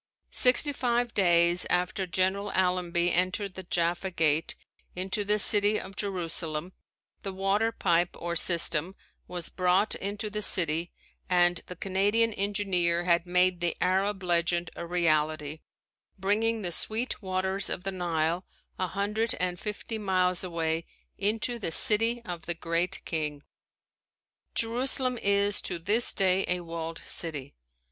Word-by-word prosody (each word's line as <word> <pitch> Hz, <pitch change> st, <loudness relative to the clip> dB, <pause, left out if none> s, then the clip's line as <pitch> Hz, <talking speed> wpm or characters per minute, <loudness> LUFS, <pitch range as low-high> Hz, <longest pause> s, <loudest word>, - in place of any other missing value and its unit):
Sixty 265 Hz, +3 st, +3 dB
five 240 Hz, -2 st, -1 dB
days 175 Hz, -2 st, +4 dB
after 180 Hz, +1 st, -1 dB
General 190 Hz, +3 st, -1 dB
Allenby 180 Hz, -1 st, +1 dB
entered 185 Hz, +2 st, -1 dB
the 190 Hz, -, -7 dB
Jaffa 175 Hz, +1 st, -1 dB
Gate 160 Hz, -3 st, 0 dB, 0.4 s
into 190 Hz, +4 st, -1 dB
the 210 Hz, +1 st, +1 dB
city 210 Hz, 0 st, +4 dB
of 195 Hz, +1 st, -10 dB
Jerusalem 170 Hz, -3 st, -2 dB, 0.5 s
the 195 Hz, -, -5 dB
water 195 Hz, +4 st, 0 dB
pipe 175 Hz, -5 st, 0 dB
or 170 Hz, 0 st, -4 dB
system 170 Hz, +1 st, +3 dB, 0.3 s
was 175 Hz, -2 st, -4 dB
brought 185 Hz, +3 st, +1 dB
into 205 Hz, +2 st, -4 dB
the 210 Hz, +1 st, -4 dB
city 170 Hz, -4 st, +3 dB, 0.4 s
and 175 Hz, -1 st, +3 dB
the 180 Hz, -, -7 dB
Canadian 205 Hz, +5 st, +1 dB
engineer 195 Hz, -4 st, 0 dB
had 170 Hz, 0 st, +1 dB
made 180 Hz, 0 st, +2 dB
the 175 Hz, -1 st, -2 dB
Arab 190 Hz, +2 st, 0 dB
legend 175 Hz, 0 st, 0 dB
a 170 Hz, -, -6 dB
reality, 155 Hz, -3 st, 0 dB, 0.6 s
bringing 215 Hz, +3 st, 0 dB
the 175 Hz, -, -2 dB
sweet 225 Hz, +9 st, +1 dB
waters 190 Hz, 0 st, 0 dB
of 180 Hz, -, -4 dB
the 195 Hz, -, -3 dB
Nile, 170 Hz, -1 st, -1 dB, 0.4 s
a 185 Hz, -, 0 dB
hundred 210 Hz, +5 st, -2 dB
and 180 Hz, -1 st, -2 dB
fifty 215 Hz, +1 st, -5 dB
miles 185 Hz, -3 st, +1 dB
away, 165 Hz, -2 st, -2 dB, 0.3 s
into 220 Hz, +4 st, 0 dB
the 185 Hz, -, -3 dB
City 225 Hz, +6 st, +4 dB
of 175 Hz, -3 st, -7 dB
the 170 Hz, -, -1 dB
Great 170 Hz, +3 st, -2 dB
King. 150 Hz, -4 st, -3 dB, 1.1 s
Jerusalem 250 Hz, +1 st, +1 dB
is 200 Hz, 0 st, +1 dB
to 180 Hz, -, -3 dB
this 205 Hz, +8 st, +3 dB
day 190 Hz, -1 st, +2 dB
a 180 Hz, 0 st, 0 dB
walled 165 Hz, -1 st, -6 dB
city. 145 Hz, -6 st, -2 dB
185 Hz, 140 wpm, -28 LUFS, 170-205 Hz, 1.1 s, days